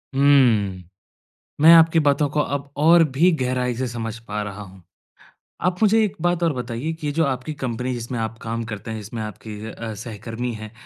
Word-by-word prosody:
हुँ। 120 -10 +3 0.8
मैं 165 +2 +9
आपकी 165 0 +6
बातों 145 0 +2
को 150 - -1
अब 140 -1 -2
और 165 +3 +6
भी 175 +6 +5
गहराई 125 -1 0
से 130 +1 -2
समझ 115 -1 -5
पा 105 0 -3
रहा 105 0 -7
हूँ। 95 -2 -12 0.8
आप 180 +2 0
मुझे 220 +1 +4
एक 210 - -2
बात 175 0 +1
और 165 - +2
बताइए 125 +5 -4
कि 160 -2 -6
ये 145 - -2
जो 165 +2 +2
आपकी 135 +2 -3
कंपनी, 125 -2 -3
जिसमें 120 +1 -5
आप 115 0 -3
काम 115 +1 -3
करते 105 +1 -6
हैं, 110 - -4
जिसमें 110 +2 -7
आपके 110 +1 -8 0.2
अ, 115 0 -6
सहकर्मी 115 +2 -6
हैं 110 -1 -8
125 Hz, 195 wpm, -22 LUFS, 110-150 Hz, 0.8 s, मैं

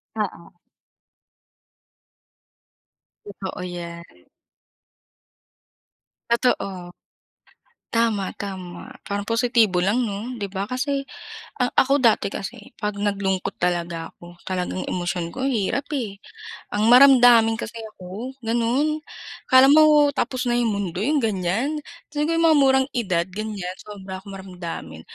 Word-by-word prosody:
Oo. 185 -5 -5 2.7
Totoo 195 -2 -7
yan. 170 - -9 2.0
Totoo. 195 -7 0 1.1
Tama, 220 -4 +1
tama. 185 -3 -7 0.2
Parang 200 0 -2
positibo 230 -5 +2
lang 215 +7 +1
'no, 220 +4 -4
di 200 -3 -4
ba? 195 +2 -3
Kasi 275 +2 -1 0.6
ang 250 - +2
ako, 275 +2 +4
dati 230 -3 +4
kasi 225 +5 -5 0.2
'pag 210 -2 -2
naglungkot 200 -2 -1
talaga 170 -2 -1
ako, 175 0 -14
talagang 185 0 -2
emosyon 175 -1 -2
ko, 260 +6 -4
ang 270 - +1
hirap 240 +6 -1
eh, 220 -8 -3 0.6
ang 210 +1 +2
maramdamin 245 -4 +7
kasi 225 +1 -6
ako, 210 +9 -8
ganun. 250 +7 +1 0.5
Akala 260 +1 +7
mo 300 -2 +6
tapos 255 -1 -2
na 240 - +1
yung 235 -2 +1
mundo, 195 -4 -3
yung 295 +7 +2
ganiyan. 220 - -1 0.3
Siguro 300 +3 0
yung 330 - +3
mga 315 -2 +6
murang 265 0 +4
edad, 185 -8 0
ganiyan, 195 -2 -5
sobra 190 -2 -8
akong 195 0 -10
maramdamin. 170 - -8
210 Hz, 115 wpm, -23 LUFS, 185-250 Hz, 2.7 s, maramdamin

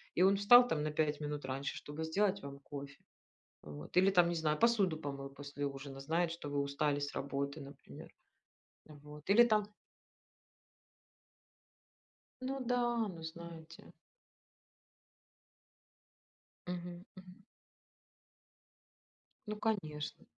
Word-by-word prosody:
и 180 - +2
он 195 +1 +6
встал 245 +5 +8
там 150 -9 0
на 155 - -1
5 150 -1 0
минут 150 0 -3
раньше, 135 +1 -3
чтобы 150 +2 -6
сделать 195 +4 +1
вам 140 0 -8
кофе, 140 0 -9 0.6
вот. 75 - -10
Или 190 +2 +6
там, 175 -2 +5
не 175 - -1
знаю, 155 -2 +1
посуду 210 -8 +3
помыл 140 -2 -5
после 145 +1 -6
ужина, 135 0 -8
знает, 165 +4 0
что 165 -3 -6
вы 145 0 -1
устали 140 +1 0
с 145 0 -3
работы, 140 +2 -3
например. 140 0 -11 0.8
Вот. 150 0 -13
Или 220 +4 +8
там 215 -3 +2 2.7
Ну 265 +1 -3
да, 240 -3 +1
ну 165 -1 -10
знаете. 165 0 -10 2.7
Мгм 175 0 -6
мгм. 185 0 -13 2.1
Ну 210 - -3
конечно. 170 -10 -3
160 Hz, 115 wpm, -35 LUFS, 145-190 Hz, 2.7 s, встал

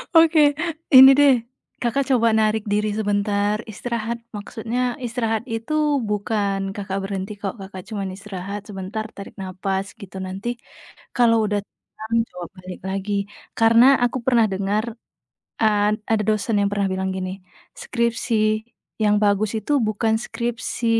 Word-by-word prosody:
Oke, 325 0 +6 0.6
ini 265 +1 +12
deh, 285 -2 +7 0.5
Kakak, 240 +4 +1
coba 235 -3 +4
narik 215 0 +1
diri 210 +1 +1
sebentar 205 -1 +1 0.2
istirahat. 235 +1 -3 0.2
Maksudnya 225 +3 -4 0.3
istirahat 225 -2 -1
itu 225 +6 -3 0.4
bukan, 200 -2 -1
Kakak, 195 -1 -4
berhenti 195 +1 -4
kok, 195 - -2
Kakak, 190 -1 -8
cuman 200 -3 -3
istirahat 200 0 -6
sebentar 195 +2 -4
tarik 200 - -9
napas 190 +1 -2
gitu 195 -3 -11
nanti, 190 +4 -6 0.7
kalau 235 -2 +5
udah 205 0 0
tenang 220 +2 -9 0.2
coba 175 -1 -6
balik 185 0 -9
lagi. 195 +1 -3 0.5
Karena 230 +2 +6 0.2
aku 245 +1 0
pernah 235 -4 +4
dengar, 200 +3 0 0.8
eee, 210 -1 +3 0.2
ada 215 -1 +2
dosen 215 +1 0
yang 200 - +2
pernah 200 -1 0
bilang 190 0 -1
gini, 185 -1 -3 0.5
"Skripsi 235 -1 -1 0.7
yang 210 0 +4
bagus 205 0 +2
itu 295 - -5 0.2
bukan 220 +1 +1
skripsi 235 0 -3
210 Hz, 135 wpm, -22 LUFS, 195-230 Hz, 0.8 s, ini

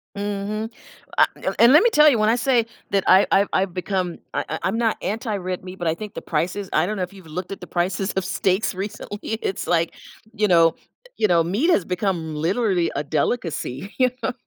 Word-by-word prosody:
Mhm, 205 +2 -3 0.5
I - - +7 0.3
and 235 +4 +7
let 315 - +7
me 475 - +5
tell 305 -7 +6
you, 250 - +2
when 215 0 +3
I 230 - +4
say 245 -3 +2 0.3
that 195 -1 +2
I've 190 +2 +6
I've 200 +1 +4
I've 185 -2 0
become 180 -1 -2
I - - -1
I 160 - -4
I'm 195 +4 0
not 230 -2 +1
anti 215 +3 -2
red 185 -1 -4
meat, 185 0 -8
but 175 -2 -1
I 160 - 0
think 210 +3 -8
the - - -6
prices 180 +5 -2
I - - +2
don't 215 - -2
know 190 - -2
if 180 - -6
you've 190 -3 -14
looked 175 +4 -6
at 195 - -6
the - - -10
prices 185 +2 -1
of 190 - -1
steaks 190 +4 0
recently, 205 +1 -6 0.2
it's 190 - -3
like, 170 -1 +1 0.4
you 210 0 +1
know 165 -2 +5 0.4
you 215 - +2
know, 170 -2 +4
meat 205 - 0
has 205 - +3
become, 180 -4 -2
literally, 180 +2 +1
a - - +1
delicacy, 155 - -2
you 255 -1 +4
know? 250 - -1
195 Hz, 220 wpm, -22 LUFS, 175-215 Hz, 0.5 s, I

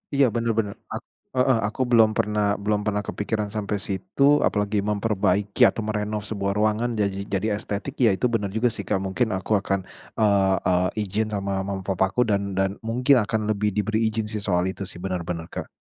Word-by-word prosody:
Iya 140 0 +5
bener 115 0 +1
bener 105 -3 0 0.2
ak - - -4 0.3
heeh, 130 -1 +3
aku 110 - -4
belum 115 -2 +6
pernah 105 -1 +1 0.2
belum 105 0 +1
pernah 105 0 0
kepikiran 105 0 -2
sampai 105 0 -1
situ. 100 +7 -2 0.2
Apalagi 105 0 0
memperbaiki 100 0 0
atau 115 - -2
merenov 105 0 -2
sebuah 100 -2 -2
ruangan 110 +3 +1
jadi 100 -2 0 0.2
jadi 100 +2 0
estetik, 105 +5 -4
ya - - +6
itu 110 - -1
bener 105 -3 +1
juga 120 +2 +3
sih 110 -2 -3
Kak. 95 - 0
Mungkin 105 +6 0
aku 95 - -8
akan, 100 0 -1 0.4
eee 100 -3 +3
eee, 90 0 +3 0.2
ijin 105 +2 -1
sama 100 -1 -1
mama 95 -1 -3
papaku 95 +5 +1
dan 100 -3 -1
dan 95 0 +2
mungkin 125 +5 +2
akan 110 0 -1
lebih 105 0 +1
diberi 110 +1 0
ijin 110 0 -2
sih 110 - -2
soal 90 -2 +2
itu 100 - -7
sih, - - -7
bener 95 -2 -2
bener 85 -2 -3
Kak. - - -5
105 Hz, 195 wpm, -24 LUFS, 100-110 Hz, 0.4 s, belum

